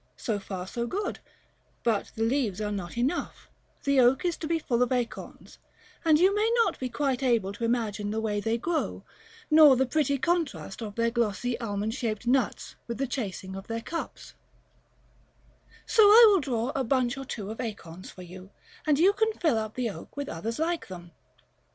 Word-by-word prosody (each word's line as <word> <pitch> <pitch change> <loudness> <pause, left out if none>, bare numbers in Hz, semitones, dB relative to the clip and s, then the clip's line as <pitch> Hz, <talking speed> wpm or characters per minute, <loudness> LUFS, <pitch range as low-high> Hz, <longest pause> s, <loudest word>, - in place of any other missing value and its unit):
So 215 -3 -2
far 190 -2 -6
so 235 +5 -4
good: 400 - -3 0.6
but 225 -4 0
the 225 - -1
leaves 225 -5 0
are 210 -1 -2
not 195 -1 -5
enough; 265 +9 -2 0.3
the 280 -1 +3
oak 255 +7 +4
is 345 -2 +1
to 315 - -5
be 330 +1 +1
full 245 -6 -1
of 250 - +2
acorns, 245 -2 -4 0.4
and 315 -2 +4
you 375 +3 +5
may 435 +2 +2
not 380 - -3
be 255 - -3
quite 270 +1 -1
able 230 -7 +1
to 220 - -7
imagine 220 -3 -1
the 220 +1 -2
way 210 -2 -1
they 225 +2 0
grow, 325 +7 -2 0.5
nor 305 -3 +8
the 265 +1 +2
pretty 280 +1 +1
contrast 275 - -2
of 210 -2 -6
their 230 0 +1
glossy 235 +1 -1
almond 210 -1 -2
shaped 230 -3 -3
nuts 250 -1 0
with 235 - -4
the 275 - 0
chasing 195 -7 -5
of 195 0 -8
their 230 0 -3
cups; 330 +7 -6 1.5
so 445 - +3
I 430 +3 +9
will 395 -2 +4
draw 250 -2 -1
a 270 - 0
bunch 255 0 +1
or 270 - -6
two 215 -5 -5
of 225 - -5
acorns 185 -6 -7
for 185 - -11
you, 185 +2 -11 0.4
and 295 -2 +4
you 370 +6 +5
can 440 +2 +1
fill 315 - +1
up 215 0 -5
the 245 -3 -1
oak 200 - -12
with 285 -1 -4
others 220 +8 -4
like 330 +2 -1
them. 175 -2 -10
240 Hz, 195 wpm, -27 LUFS, 210-285 Hz, 1.5 s, I